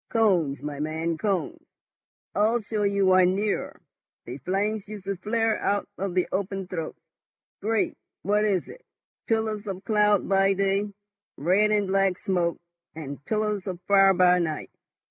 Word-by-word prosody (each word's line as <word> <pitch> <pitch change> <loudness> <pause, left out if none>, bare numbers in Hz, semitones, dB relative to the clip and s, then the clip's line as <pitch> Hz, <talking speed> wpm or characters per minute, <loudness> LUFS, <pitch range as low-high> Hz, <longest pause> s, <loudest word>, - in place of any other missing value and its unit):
"Cones, 180 -11 +2
my 145 -1 -5
man, 160 +2 -2
cones. 190 -6 -1 0.7
I'll 220 +4 +2
show 215 -1 -3
you 200 -1 +2
one 185 0 +5
nearer. 205 +1 -2 0.5
The 125 +4 -7
flames 200 +6 -1
used 210 -2 -8
to 200 0 -2
flare 225 +2 0
out 205 0 0
of 190 -2 -4
the 180 - +2
open 195 0 -2
throats, 165 -4 -5 0.6
great—what 210 -1 -1
is 200 -4 +1
it?—pillars 220 - -5
of 190 -1 -5
cloud 210 -1 +2
by 195 0 +3
day, 195 +1 0 0.5
red 185 +8 +3
and 210 -1 +2
black 195 -1 +1
smoke, 175 -3 0 0.4
and 145 -3 -7
pillars 210 -2 -1
of 180 -2 -4
fire 195 0 +5
by 180 0 +5
night. 160 -3 -3
195 Hz, 145 wpm, -26 LUFS, 180-210 Hz, 0.7 s, one